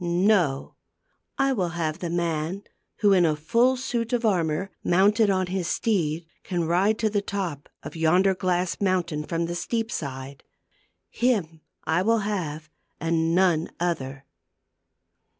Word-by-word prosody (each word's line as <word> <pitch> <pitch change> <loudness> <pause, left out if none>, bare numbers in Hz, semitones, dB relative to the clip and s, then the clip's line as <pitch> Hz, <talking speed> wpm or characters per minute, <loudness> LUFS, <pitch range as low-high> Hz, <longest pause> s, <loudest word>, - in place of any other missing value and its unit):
No; 175 -5 +2 0.6
I 275 0 +2
will 185 -8 0
have 160 -2 -2
the 175 - -3
man 170 +2 -2 0.4
who, 205 -2 +5
in 185 -2 +5
a 155 -2 +3
full 235 +12 +2
suit 245 -2 -2
of 240 -1 +1
armor, 180 -2 0
mounted 205 +4 +4
on 185 -1 +2
his 180 -1 -2
steed, 170 -7 0 0.2
can 175 -3 -2
ride 190 +6 +2
to 220 - +1
the 205 -1 +1
top 185 -8 -4
of - - -8
yonder 180 +4 +3
glass 180 -1 -1
mountain 180 -6 0
from 165 +2 -2
the 170 - -4
steep 225 +6 -2
side. 135 -1 -6 0.7
Him 190 -11 0 0.3
will 185 +8 +3
I - - -4
have, 160 -7 -3 0.3
and 165 0 +1
none 175 -3 +3
other." 140 -6 -3
175 Hz, 145 wpm, -25 LUFS, 160-200 Hz, 0.7 s, who